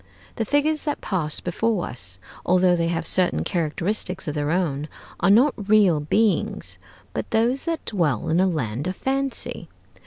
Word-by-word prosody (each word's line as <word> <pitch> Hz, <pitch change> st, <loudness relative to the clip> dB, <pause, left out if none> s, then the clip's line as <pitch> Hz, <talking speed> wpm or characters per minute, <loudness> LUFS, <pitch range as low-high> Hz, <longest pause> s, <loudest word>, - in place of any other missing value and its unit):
The 225 Hz, -, 0 dB
figures 290 Hz, +4 st, +1 dB
that 295 Hz, -, -1 dB
pass 160 Hz, -6 st, -2 dB
before 200 Hz, +2 st, -1 dB
us, 95 Hz, -6 st, -3 dB, 0.3 s
although 180 Hz, 0 st, +4 dB
they 170 Hz, -1 st, 0 dB
have 165 Hz, -1 st, -2 dB
certain 180 Hz, +2 st, +2 dB
characteristics 180 Hz, +3 st, -2 dB
of 150 Hz, -, -1 dB
their 145 Hz, -1 st, -1 dB
own, 155 Hz, -4 st, 0 dB, 0.3 s
are 175 Hz, -, +3 dB
not 245 Hz, +8 st, +5 dB, 0.2 s
real 200 Hz, -7 st, +5 dB
beings, 205 Hz, +8 st, 0 dB, 0.3 s
but -, -, -4 dB
those 240 Hz, +5 st, +1 dB
that 330 Hz, -1 st, -3 dB
dwell 165 Hz, -, 0 dB
in 165 Hz, +2 st, +2 dB
a 190 Hz, -, +4 dB
land 140 Hz, -, -2 dB
of 185 Hz, -, -3 dB
fancy. 270 Hz, 0 st, -2 dB
180 Hz, 160 wpm, -23 LUFS, 160-225 Hz, 0.3 s, not